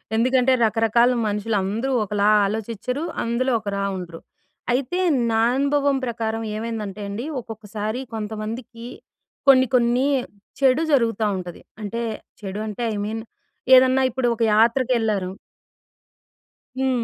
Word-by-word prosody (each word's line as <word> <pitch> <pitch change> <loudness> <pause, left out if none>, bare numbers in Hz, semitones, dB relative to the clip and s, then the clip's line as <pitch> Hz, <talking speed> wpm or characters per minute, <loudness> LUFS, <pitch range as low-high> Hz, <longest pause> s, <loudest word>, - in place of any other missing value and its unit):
ఎందుకంటే, 255 +2 +3
రకరకాల 225 +2 +3 0.2
మనుషులందరూ 210 +4 -1
ఒకలా 205 0 0 0.2
ఆలోచించరు, 225 +7 -3 0.2
అందులో 240 +3 0
ఒకలా 200 -2 -3
ఉండరు. 170 -2 -8 0.5
అయితే 280 +8 -1 0.3
నా 225 0 +2
అనుభవం 280 0 +2
ప్రకారం 225 -1 -3
ఏమైందంటే 215 -3 -5
అండి. 225 +7 -4
ఒక్కొక్కసారి 215 +1 -5
కొంతమందికి 225 +2 -6 0.6
కొన్ని, 260 -1 +7
కొన్ని 245 +2 +3 0.6
చెడు 270 +4 +4
జరుగుతా 230 -5 +2
ఉంటది. 180 -2 -8 0.2
అంటే 220 +3 -4 0.4
చెడు 200 0 -5
అంటే 215 +3 -5
ఐ - - -3
మీన్ 220 +1 -4 0.5
ఏదన్నా 260 +1 +5
ఇప్పుడొక 240 -2 -1
యాత్రకెళ్లరు. 225 -4 +2 1.5
హ్మ్. 260 -3 +1
230 Hz, 105 wpm, -22 LUFS, 210-255 Hz, 1.5 s, కొన్ని